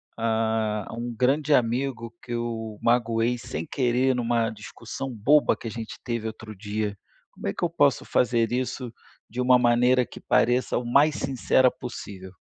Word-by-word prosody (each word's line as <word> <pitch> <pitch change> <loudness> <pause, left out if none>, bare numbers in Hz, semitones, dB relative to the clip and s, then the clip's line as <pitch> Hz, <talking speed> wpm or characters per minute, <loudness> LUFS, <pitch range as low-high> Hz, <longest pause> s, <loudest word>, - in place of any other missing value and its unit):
a 110 -2 0
a - - -8
um 120 +1 -4
grande 140 +5 +1
amigo 120 -1 -1
que 120 - -11
eu 115 -2 -4
magoei 115 0 +1
sem 80 -8 -5
querer 130 0 +1
em - - -2
uma 115 -1 +1
discussão 115 +4 -7
boba 125 +7 +3
que - - -7
a - - -4
gente 115 0 -7
teve 115 -2 -3
outro 110 0 -8
dia, 105 +1 -3 0.4
como - - -7
é 100 - -1
que - - -5
eu - - 0
posso 145 -5 +2
fazer 115 -1 +1
isso 125 -1 -3 0.3
de 125 +3 -4
uma 125 0 +5
maneira 125 +1 +3
que - - -12
pareça 125 0 +2
o 120 - -3
mais 140 +5 +4
sincera 130 -1 +2
possível? 100 -7 -8
120 Hz, 175 wpm, -25 LUFS, 110-125 Hz, 0.4 s, uma